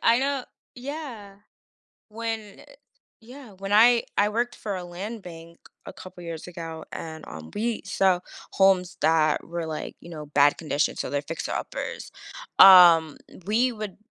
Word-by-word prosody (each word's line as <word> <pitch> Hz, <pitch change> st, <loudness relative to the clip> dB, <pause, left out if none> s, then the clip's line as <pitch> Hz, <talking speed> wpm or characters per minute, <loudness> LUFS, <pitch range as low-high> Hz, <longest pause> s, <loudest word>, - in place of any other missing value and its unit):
I 230 Hz, +1 st, +4 dB
know 275 Hz, -1 st, -1 dB, 0.3 s
Yeah. 250 Hz, -7 st, -8 dB, 0.7 s
When 220 Hz, -2 st, -6 dB
e -, -, -14 dB, 0.6 s
Yeah, 250 Hz, +1 st, -13 dB
when 195 Hz, 0 st, -5 dB
I 235 Hz, +2 st, +6 dB
I 205 Hz, +1 st, +3 dB
worked 240 Hz, +3 st, -2 dB
for 205 Hz, -2 st, -5 dB
a 180 Hz, -, -5 dB
land 195 Hz, +6 st, -7 dB
bank 170 Hz, -1 st, -12 dB, 0.3 s
a -, -, -8 dB
couple 185 Hz, -1 st, -12 dB
years 165 Hz, -1 st, -7 dB
ago, 165 Hz, -2 st, -7 dB
and, 160 Hz, -1 st, -7 dB
um, 80 Hz, 0 st, -10 dB
we 225 Hz, +1 st, -2 dB
saw 190 Hz, -2 st, +2 dB, 0.3 s
homes 185 Hz, -1 st, +2 dB
that 155 Hz, -1 st, +2 dB
were, 170 Hz, 0 st, -4 dB
like, 155 Hz, -1 st, -6 dB
you 170 Hz, -, -12 dB
know, 155 Hz, -3 st, -8 dB
bad 145 Hz, 0 st, +3 dB
condition, 150 Hz, -2 st, -1 dB
so -, -, -3 dB
they're 145 Hz, 0 st, -1 dB
fixer-uppers. 160 Hz, +3 st, -5 dB, 0.5 s
Um, 170 Hz, -5 st, +8 dB, 0.3 s
we 235 Hz, +5 st, +2 dB
would 215 Hz, -4 st, -7 dB
190 Hz, 155 wpm, -25 LUFS, 165-225 Hz, 0.7 s, Um